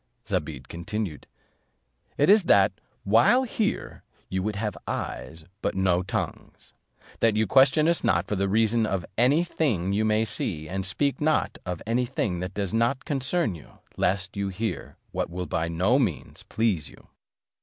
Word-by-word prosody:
Zobeide - - -3
continued, 95 -2 -5 0.9
"It 145 - +3
is 205 -1 +6
that, 100 -7 +5 0.3
while 120 - +5
here, 225 -4 -2 0.3
you 95 0 -1
would 105 +2 -2
have 105 +1 -2
eyes, 80 0 -5 0.2
but - - -1
no 95 -2 +2
tongues; 95 - -5 0.5
that 115 -2 +3
you 110 +1 +2
question 135 +7 +5
us 170 0 +1
not 85 0 +2
for 105 - -2
the 100 0 0
reason 110 +2 +2
of 95 -4 -2
any 135 - +4
thing 110 - 0
you 105 +2 +1
may 110 +1 +2
see, 80 -6 -2
and 95 +2 -3
speak 140 +9 -1
not 155 0 +1
of 90 -2 -4
any 120 +3 0
thing 100 -8 -2
that 90 +1 -5
does 100 -1 -2
not 120 +4 +1
concern 145 - 0
you, 80 - -13 0.2
lest 95 +1 0
you 100 0 -1
hear 105 +4 -4
what - - -2
will 90 +1 -4
by 80 -1 -1
no 95 +11 +2
means 105 - -2
please 100 -10 0
you." - - -17
105 Hz, 165 wpm, -26 LUFS, 95-125 Hz, 0.9 s, is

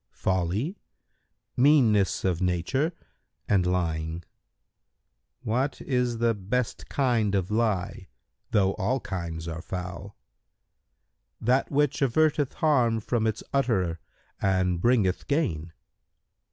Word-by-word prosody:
"—"Folly, 95 - -1 0.8
meanness 120 -10 +4
of 90 -2 0
nature, 90 - 0 0.6
and 95 -3 +2
lying." 80 -2 -1
Q - - -30 1.2
"What 130 +5 0
is 125 -3 0
the 115 0 +2
best 110 +4 -3
kind 115 -7 +1
of 95 0 -1
lie,[FN#138] 105 -5 -1 0.4
though 95 -3 +3
all 120 +7 +1
kinds 85 -6 -5
are 80 0 -5
foul?"—"That 95 +6 -6
which 145 +1 +1
averteth 145 +1 +2
harm 125 -8 +2
from 110 0 0
its 110 0 -2
utterer 95 -12 +1 0.4
and 95 -2 +1
bringeth 110 -6 +2
gain." 85 - -1
105 Hz, 100 wpm, -27 LUFS, 90-125 Hz, 1.2 s, meanness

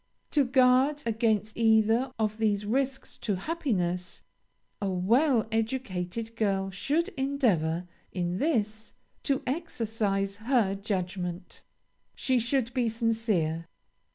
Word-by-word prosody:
"To 290 - +4
guard 260 +3 +4
against 220 -2 +1
either 225 +2 +3
of 215 -1 -1
these 210 -2 +1
risks 265 +4 -1
to 205 -4 -1
happiness, 185 - -2 0.6
a 200 - 0
well 230 - +3
educated 225 -2 -2
girl 195 -3 0
should 300 - 0
endeavor, 225 - 0 0.2
in 175 0 -2
this, 220 -8 -1 0.3
to 275 -2 0
exercise 220 - -1
her 220 -3 +2
judgment. 185 -3 -4 0.5
She 260 -2 +1
should 240 +1 0
be 245 -3 +1
sincere. 220 -8 0
220 Hz, 105 wpm, -28 LUFS, 195-255 Hz, 0.6 s, To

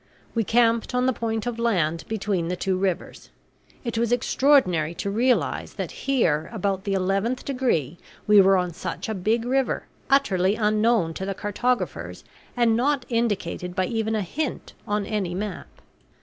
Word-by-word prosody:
We 230 - +1
camped 230 +2 +2
on 250 0 +2
the 260 - +2
point 225 -1 -2
of 240 -1 -3
land 170 -9 0
between 200 -5 -1
the 180 - -1
two 190 +1 -1
rivers. 185 -1 -3 0.5
It 235 -2 -2
was 235 0 0
extraordinary 225 - +3
to 200 - -3
realize 245 +4 +1
that - - -4
here 170 - 0
about 195 -3 -2
the 200 - 0
eleventh 195 +6 0
degree 205 - -1 0.3
we 210 -1 +7
were 195 0 +5
on 180 -1 -1
such 180 - -5
a 220 - -2
big 220 +4 0
river, 265 +1 0 0.3
utterly 200 -9 +3
unknown 215 -4 +2
to 190 - -5
the 195 - -2
cartographers 245 +6 -2 0.3
and 235 -2 +4
not 265 +2 +1
indicated 205 -6 -1
by 185 -1 +1
even 220 0 -1
a 215 - 0
hint 290 - -4
on 210 -1 0
any 195 -5 -2
map. 205 +2 -4
215 Hz, 165 wpm, -24 LUFS, 185-240 Hz, 0.5 s, we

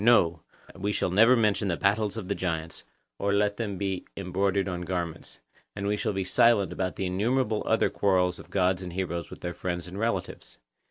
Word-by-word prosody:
No, 85 -8 +4 0.3
we 100 +2 -2
shall 95 - -1
never 115 +7 +6
mention 105 -3 +2
the 85 -3 0
battles 105 +2 +1
of 100 -5 -5
the 100 - 0
giants, 80 -4 -3 0.4
or 100 - +1
let 100 0 +2
them 105 -4 -3
be 95 -2 -3
embroidered 95 +2 0
on 90 -2 -3
garments; 85 -2 -4 0.4
and 100 -1 -4
we 105 +1 +1
shall 105 - -1
be 95 0 -1
silent 100 +1 +3
about 90 -1 -2
the 95 - -2
innumerable 110 +4 +1
other - - +2
quarrels 90 -2 +2
of - - -12
gods 95 -1 +1
and 90 -2 -6
heroes 85 -3 -3
with - - -11
their 85 - -3
friends 85 0 -4
and 95 +3 -7
relatives. 115 +1 -3
95 Hz, 200 wpm, -27 LUFS, 90-105 Hz, 0.4 s, never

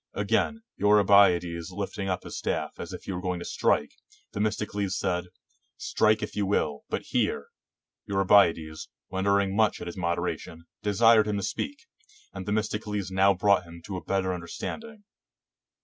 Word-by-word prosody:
Again, 115 - 0
Eurybiades 95 -5 +4
lifting 95 +1 -4
up 90 - -2
his - - -8
staff - - -3
as - - -6
if - - -8
he - - -5
were 90 -1 -4
going 90 -1 -2
to 85 - -7
strike, - - +1 0.4
Themis 105 +1 0
tocles 100 -2 -2
said, 90 -1 -1 0.5
"Strike 110 0 +2
if 105 - -5
you 100 -2 0
will, 75 -7 0
but - - -2
hear"; - - -1 0.6
Eurybiades, 90 -5 +3 0.2
wondering 100 +1 +1
much 110 0 +2
at - - -6
his 85 +2 -7
moderation, 85 -1 -3 0.2
desired 110 +1 +5
him 105 -1 0
to 100 - -3
speak, 280 - -4 0.5
and 95 -1 -7
Themistocles 105 -2 -2
now 95 +1 +4
brought 100 0 +3
him 85 0 -12
to 95 - -5
a 90 - -5
better 95 -1 0
under 85 -1 -6
standing. 220 - -7
100 Hz, 160 wpm, -27 LUFS, 90-105 Hz, 0.6 s, desired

